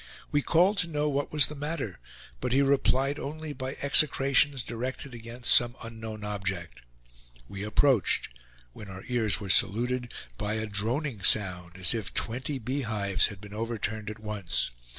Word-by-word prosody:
We 145 - +2
called 180 +7 +3
to 190 - +1
know 150 -2 -1
what 145 -1 -2
was 150 -3 +5
the - - -5
matter; 145 - -5 0.4
but 125 - -2
he 140 +2 +4
replied 135 +1 +1
only 155 +1 -6
by 130 -1 -5
execrations 140 -2 +5
directed 125 +3 -5
against 120 +1 0
some 120 0 +4
unknown 110 -2 -7
object. 95 -5 -4 0.7
We 100 - -7
approached, 105 - +2 0.5
when 105 - -10
our 95 0 -9
ears 115 -4 +2
were 100 -2 -7
saluted 120 +6 +2 0.3
by 105 +1 -2
a 110 0 -2
droning 110 +4 -2
sound, 90 -4 +3
as 90 +1 +2
if 110 -4 -4
twenty 130 +5 0
bee 130 +4 -3
hives 105 -5 +1
had 100 -3 -9
been 105 0 -11
overturned 110 -1 -4
at 110 - -7
once. 105 - -2
115 Hz, 160 wpm, -28 LUFS, 105-140 Hz, 0.7 s, was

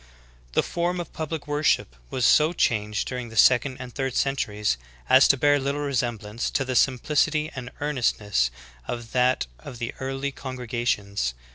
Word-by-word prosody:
The - - +3
form 175 +1 -1
of 175 - -6
public 160 -1 -4
worhip 150 +1 +2 0.2
was 130 -2 0
so 155 +3 +5
changed 105 - 0
during 125 -2 -4
the 115 - -9
second 130 +4 +5
and 125 -2 -8
third 135 -2 -2
centuries 105 - 0 0.3
as 130 +1 +7
to 140 - +4
bear 145 +2 +4
little 140 +2 -2
resemblance 120 -5 -2
to 135 - -1
the 130 0 -2
simplicity 150 +4 +2
and 125 -2 -6
earnestness 110 - +1 0.4
of 120 -1 -5
that 125 0 +2
of 120 - -9
the 115 0 -4
early 135 +1 -3
congre 130 -2 -7
gations. 100 - -1
130 Hz, 160 wpm, -25 LUFS, 115-145 Hz, 0.4 s, as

